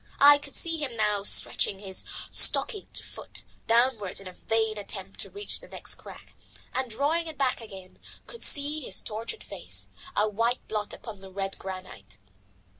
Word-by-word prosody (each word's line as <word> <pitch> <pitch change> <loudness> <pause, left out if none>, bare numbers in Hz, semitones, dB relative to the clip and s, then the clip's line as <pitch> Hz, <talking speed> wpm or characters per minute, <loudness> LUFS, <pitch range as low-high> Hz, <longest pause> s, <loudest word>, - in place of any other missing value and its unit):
I 290 +1 +8
could 280 -1 -8
see 330 -1 +2
him 260 -6 -4
now 210 -2 +1
stretching 200 0 +2
his 190 -1 -1 0.3
stockinged 425 -6 +4
foot - - -9 0.2
downwards 230 -4 +2
in 195 - -12
a 185 - -9
vain 220 +1 0
attempt 195 -1 -7
to - - -2
reach 410 +1 0
the - - -14
next - - +3
crack, - - -11 0.4
and 260 -1 -1
drawing 295 +9 0
it 315 -2 -7
back 260 -3 0
again; 195 -4 -12 0.3
could 470 - -11
see 290 +2 +5
his - - +2
tortured 225 - -5
face, - - -5 0.3
a 210 - +3
white 230 +4 -1
blot 210 -1 -3
upon 210 -4 -10
the 190 -1 -11
red 195 0 -4
granite. 185 - -8
225 Hz, 170 wpm, -27 LUFS, 195-285 Hz, 0.4 s, I